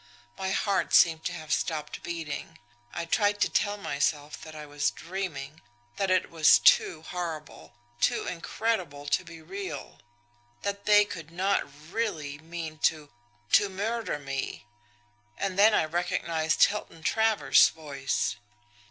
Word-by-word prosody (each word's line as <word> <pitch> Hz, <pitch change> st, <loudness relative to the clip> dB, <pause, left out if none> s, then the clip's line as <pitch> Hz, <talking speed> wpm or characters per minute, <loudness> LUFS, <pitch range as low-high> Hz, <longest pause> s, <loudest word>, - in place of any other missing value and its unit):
My 190 Hz, 0 st, -3 dB
heart 195 Hz, 0 st, +1 dB
seemed 160 Hz, -1 st, +5 dB
to 180 Hz, -, -1 dB
have 155 Hz, -4 st, -3 dB
stopped 150 Hz, -2 st, -2 dB
beating. 165 Hz, -1 st, -5 dB, 0.3 s
I 170 Hz, -, -4 dB
tried 205 Hz, +4 st, +2 dB
to -, -, +3 dB
tell 205 Hz, 0 st, 0 dB
myself 145 Hz, -4 st, -2 dB
that 155 Hz, 0 st, -10 dB
I 150 Hz, -1 st, -7 dB
was 145 Hz, 0 st, 0 dB
dreaming, 160 Hz, -5 st, -6 dB, 0.4 s
that 195 Hz, -, 0 dB
it 185 Hz, 0 st, +2 dB
was 160 Hz, -2 st, +6 dB
too 160 Hz, -2 st, +4 dB
horrible, 165 Hz, -8 st, -6 dB, 0.2 s
too -, -, +1 dB
incredible 175 Hz, -5 st, -2 dB
to 145 Hz, -, +1 dB
be 165 Hz, -1 st, -12 dB
real; 195 Hz, +4 st, -7 dB, 0.6 s
that 200 Hz, 0 st, -3 dB
they 210 Hz, 0 st, +7 dB
could 170 Hz, -5 st, -8 dB
not 185 Hz, -2 st, 0 dB, 0.2 s
really 155 Hz, -11 st, -2 dB
mean 160 Hz, -1 st, -7 dB
to 155 Hz, -2 st, 0 dB, 0.4 s
to 205 Hz, -, +5 dB
MURDER 215 Hz, +1 st, -2 dB
me. 135 Hz, -5 st, -5 dB, 0.7 s
And 195 Hz, -1 st, -2 dB
then 210 Hz, +1 st, +7 dB
I -, -, +3 dB
recognised 170 Hz, -1 st, 0 dB
Hilton 200 Hz, -6 st, 0 dB
Travers' 220 Hz, +2 st, +4 dB
voice. 140 Hz, -4 st, -2 dB
170 Hz, 135 wpm, -28 LUFS, 155-195 Hz, 0.7 s, they